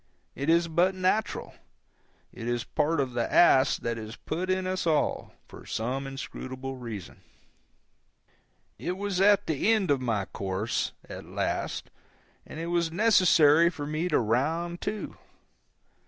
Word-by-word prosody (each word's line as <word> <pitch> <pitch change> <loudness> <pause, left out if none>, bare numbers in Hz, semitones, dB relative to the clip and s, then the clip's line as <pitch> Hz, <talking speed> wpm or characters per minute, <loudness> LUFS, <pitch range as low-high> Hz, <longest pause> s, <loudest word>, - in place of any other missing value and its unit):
It 140 +3 -3
is 170 +1 +4
but 175 +4 +2
natural. 185 +4 -1 0.8
It 115 - -7
is 120 0 -1
part 155 +4 0
of 130 -3 -1
the 120 -1 -1
ass 135 -6 +5
that 115 -1 -3
is 110 +1 -7
put 175 +7 -4
in 185 0 0
us 185 -1 -2
all, 155 -2 0 0.2
for - - -12
some 130 +5 -3
inscrutable 135 -1 -6
reason. 110 -7 -8 1.6
I 180 - -1
was 195 -1 -2
at 205 0 +5
the 160 +7 +1
end 210 -7 +2
of 135 -2 +2
my 110 -6 -1
course, 95 +4 -2
at - - -8
last, - - -3 0.6
and 155 - -8
it 165 - -3
was 170 -2 +1
necessary 170 -6 +5
for 150 -4 -6
me 155 +4 -2
to 150 - +3
round 160 +10 0
to. 215 - -4
155 Hz, 145 wpm, -28 LUFS, 125-180 Hz, 1.6 s, ass